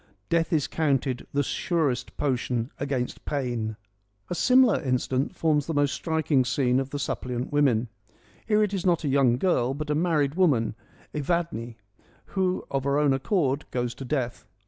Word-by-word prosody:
Death 165 +1 +1
is 155 -4 +2
counted 135 -5 0
the 145 0 +1
surest 140 -5 -1
potion 125 -3 -1
against 135 -3 -2
pain.' 120 -6 -2 0.5
A - - +2
similar 250 +4 +4
incident 130 0 -1
forms 150 -3 +1
the 165 - -2
most 145 -1 +2
striking 160 -5 +1
scene 125 0 +1
of 135 0 -3
the 145 - -4
Suppliant 125 -2 -3
Women. 130 -5 +3 0.6
Here 215 -1 +4
it 205 -1 -1
is 190 -3 -2
not 175 -3 +2
a - - -1
young 135 -3 +3
girl, 130 -6 +1
but 150 +1 -3
a - - +3
married 150 -3 +1
woman, 145 - +2 0.4
Evadne, 150 -6 -2 0.6
who 185 -1 0
of 135 -1 0
her 140 +1 +1
own 145 -2 +3
accord 140 0 0
goes 120 -1 -2
to - - -8
death. 125 -2 -3
140 Hz, 165 wpm, -26 LUFS, 125-160 Hz, 0.6 s, similar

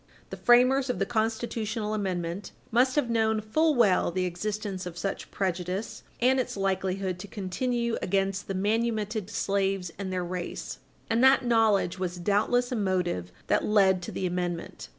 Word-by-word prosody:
The - - -5
framers 255 +2 +4
of 250 - 0
the - - 0
constitutional 220 -1 -2
amendment 185 -2 -3 0.2
must 255 +3 +3
have 295 -5 +2
known 220 -1 +2
full 305 +9 +2
well 210 -7 +4
the 185 +1 -1
existence 195 +1 -3
of 175 -1 -8
such 195 +2 -4
prejudice 185 +2 -3 0.2
and 260 +2 +3
its 250 - -2
likelihood 190 -1 -1
to 205 - -7
continue 235 +5 -2
against 195 +1 0
the 195 - -3
manumitted 215 0 -1
slaves 195 -3 -1
and 190 -1 -3
their 180 -1 -2
race, 175 0 -5 0.3
and 230 +2 +2
that 265 -1 +6
knowledge 220 -6 +2
was 180 -1 -3
doubtless 210 +7 +1
a - - 0
motive 180 - -1
that - - +2
led 195 -3 +4
to 175 - -6
the 190 - -3
amendment. 175 -1 -3
200 Hz, 160 wpm, -28 LUFS, 185-230 Hz, 0.3 s, that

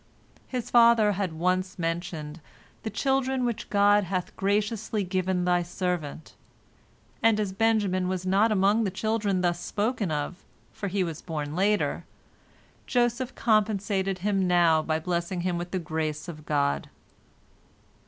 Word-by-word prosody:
" - - -30
His 250 -3 -4
father 235 -3 +6
had 195 -3 -2
once 185 +3 -1
mentioned 165 -2 -4 0.4
"the 220 - -4
children 265 0 0
which 235 -3 -3
God 205 0 +4
hath 185 0 -3
graciously 210 +1 0
given 185 -1 -1
Thy 180 0 +3
servant," 175 -3 -4 0.9
and 225 -1 +4
as 200 -3 -1
Benjamin 200 -4 +1
was 185 0 -2
not 200 +4 +3
among 205 +2 +3
the 200 - 0
children 205 -1 -1
thus 175 -1 +1
spoken 215 -2 -1
of, 150 +5 -3 0.3
for 200 - -4
he 195 0 0
was 165 -3 -5
born 150 -3 -4
later, 205 +3 +1 0.8
Joseph 245 +1 0
compensated 205 -3 +1
him 195 -3 +2
now 170 -3 +4
by 155 0 -1
blessing 175 +2 -2
him 175 -1 -1
with 175 +1 -5
the 185 - -2
grace 155 -2 -3
of 155 -3 -9
God. 140 -1 0
190 Hz, 145 wpm, -27 LUFS, 175-210 Hz, 0.9 s, father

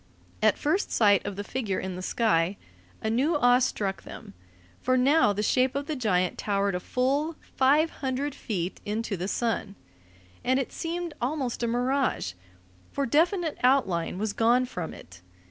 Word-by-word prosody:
At - - +4
first 320 +7 0
sight 205 -3 +4
of 205 - -4
the 205 - -4
figure 215 -4 -2
in 190 -1 -4
the 180 - -6
sky, 185 -3 +1 0.5
a 220 - 0
new 275 +8 +2
awe 245 -2 +5
struck 205 -6 -1
them, - - -11 0.5
for 255 0 +2
now 275 -2 +4
the 205 +1 -2
shape 255 +4 +2
of 280 0 -2
the 310 - -3
giant 185 -8 0
towered 200 -1 0
a 180 - -1
full 280 - 0 0.2
five 295 +5 +4
hundred 270 +1 -1
feet 190 -9 -4
into 215 0 -2
the 180 +1 -3
sun, 220 -2 -2 0.7
and 260 +1 +2
it 270 - -3
seemed 340 0 -4
almost 260 -1 -2
a 235 - +1
mirage, 250 - 0 0.6
for 280 - -1
definite 330 - +1
outline 195 -11 +2
was 210 +1 -2
gone 240 +4 +3
from 180 -9 -5
it. 90 0 -13
245 Hz, 165 wpm, -27 LUFS, 200-275 Hz, 0.7 s, awe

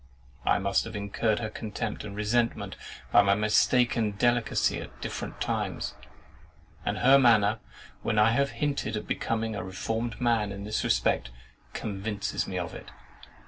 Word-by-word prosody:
I - - +4
must 100 0 +1
have 115 -1 -7
incurred 105 +1 0
her 110 -2 -3
contempt 110 +1 -4
and 100 - -7
resentment 115 +3 0 0.4
by 105 - +7
my 100 0 +3
mistaken 110 +1 +3
delicacy 120 +3 +1
at - - -11
different - - -5
times; - - -2 0.9
and - - -1
her 135 +2 +6
manner, 110 -4 +4 0.4
when 110 - -1
I 105 +1 +6
have 140 +4 +2
hinted 140 -7 -1
at 105 - -5
becoming 110 -1 -1
a - - -3
reformed 110 +5 -3
man 115 -4 +1
in 100 0 -6
this 105 +1 -2
respect, - - +1 0.4
convinces 105 0 -3
me 95 - -3
of 90 +1 -3
it. - - -9
110 Hz, 150 wpm, -28 LUFS, 100-115 Hz, 0.9 s, by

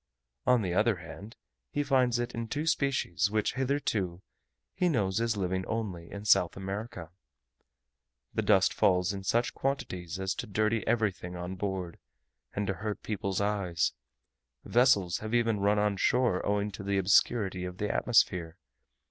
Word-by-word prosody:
On 125 -3 +4
the 90 -2 -1
other 105 +4 +3
hand, 95 +5 -10 0.3
he 145 - -1
finds 130 -4 +2
in 120 - 0 0.2
it 115 - -6
two 150 +5 -2
species 130 - +1
which 105 0 0
hitherto 115 -10 -1 0.5
he 180 - +1
knows 105 - +1
as 115 -2 0
living 95 -1 -1
only 100 -7 -4
in 100 +1 -8
South 90 -4 +4
America. 95 -3 -6 1.2
The - - 0
dust 95 -3 +4
falls 90 0 +2
in 95 -1 -6
such 115 +5 +1
quantities 95 -10 -3
as 95 -1 -1
to 115 - -6
dirty 110 +2 0
everything 105 -6 0
on 90 +1 -5
board, 95 -2 -4 0.6
and 105 - -1
to 95 - -1
hurt 105 +3 -5
people's 100 -2 -2
eyes; 100 -5 0 0.7
vessels 105 -9 +3
even 115 0 +1
have 100 - -4
run 105 +1 +3
on 105 -1 +1
shore 120 -4 +2
owing 105 0 0
to 100 - -8
the 100 0 0
obscurity 95 0 +2
of 90 0 -6
the 105 +1 -1
atmosphere. 90 -8 +2
100 Hz, 155 wpm, -30 LUFS, 95-115 Hz, 1.2 s, On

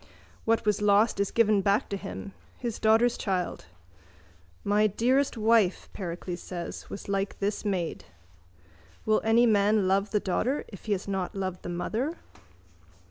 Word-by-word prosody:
What 225 -1 +2
was 210 -1 +1
lost 210 +1 +3
is 200 - +1
given 215 -3 +3
back 200 +2 +2
to 200 - -2
him: 95 - -7 0.2
his 235 -3 -4
daughter's 225 +2 +3
child. 185 -3 -2 1.0
My 210 +1 +3
dearest 255 +6 +1
wife, 220 -4 +2
Pericles 175 -1 -5
says, 175 -2 -7
was - - -7
like 195 0 -1
this 200 +1 -2
maid. 185 -5 -2 1.0
Will 215 0 +3
any 225 +2 +4
man 210 -2 +3
love 195 +2 +2
the 210 - +1
daughter 240 +9 -1
if 195 - -12
he 215 - +1
has 195 0 -4
not 195 0 -2
loved 185 -2 -3
the - - -6
mother? 225 - -2
205 Hz, 150 wpm, -28 LUFS, 190-220 Hz, 1.0 s, any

